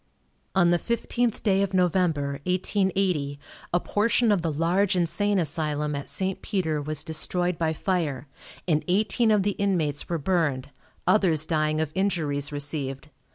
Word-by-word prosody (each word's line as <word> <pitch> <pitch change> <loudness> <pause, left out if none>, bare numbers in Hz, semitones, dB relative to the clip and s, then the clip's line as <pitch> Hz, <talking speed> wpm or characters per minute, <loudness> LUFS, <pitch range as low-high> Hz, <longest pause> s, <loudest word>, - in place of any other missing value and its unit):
On 175 -2 +4
the 175 - +3
15th 235 +1 -1
day 195 -2 +3
of 195 -1 -1
November, 165 -6 +1
1880, 185 -6 0 0.3
a 175 - +3
portion 225 +4 +2
of 200 -4 +2
the 165 -1 -1
large 175 +6 +1
insane 200 +4 +1
asylum 150 -3 -1
at 140 -1 -4
St. 190 0 -1
Peter 160 -7 -1
was 150 0 -3
destroyed 175 +2 -1
by 160 -1 +1
fire, 155 -6 -2 0.4
and 155 -3 +2
eighteen 215 +5 +2
of 210 -2 +3
the 205 - +1
inmates 165 -8 0
were 170 - 0
burned, 150 -5 0 0.3
others 170 -8 +3
dying 155 -1 0
of 160 -2 -1
injuries 155 -7 -1
received. 145 -1 -3
170 Hz, 150 wpm, -26 LUFS, 150-190 Hz, 0.4 s, On